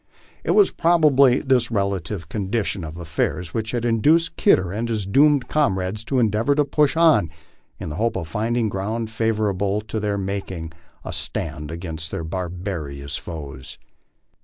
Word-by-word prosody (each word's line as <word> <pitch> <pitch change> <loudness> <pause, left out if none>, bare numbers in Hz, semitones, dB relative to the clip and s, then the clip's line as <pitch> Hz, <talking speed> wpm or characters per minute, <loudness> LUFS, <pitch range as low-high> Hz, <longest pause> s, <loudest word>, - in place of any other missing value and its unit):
It - - +1
was 410 - +6
proba 165 -4 +3
bly 130 -1 +5
this 125 -4 +3
relative 100 -5 -2
condition 100 0 -2
of 80 +1 -7
affairs 85 0 -2
which 110 -1 -2
had 120 0 -2
induced 155 +9 +3
Kidder 95 -2 +3
and 115 +4 -3
his 110 -4 -1
doomed 140 +6 +4
comrades 100 -7 0
to 135 - -1
endeavor 115 +4 +2
to 150 0 +3
push 150 +1 +2
on 155 - +5 0.5
in - - -5
the 75 - -6
hope 115 +3 0
of 85 - -3
finding 115 +6 0
ground 110 +3 -3
favorable 105 -3 0
to 110 +1 -4
their 105 -1 -1
making 95 -4 -4 0.3
a - - -5
stand 75 -2 -3
against 80 -1 -5
their 80 - -4
barbarous 85 -5 -4
foes. 75 -3 -8
105 Hz, 160 wpm, -22 LUFS, 85-120 Hz, 0.5 s, was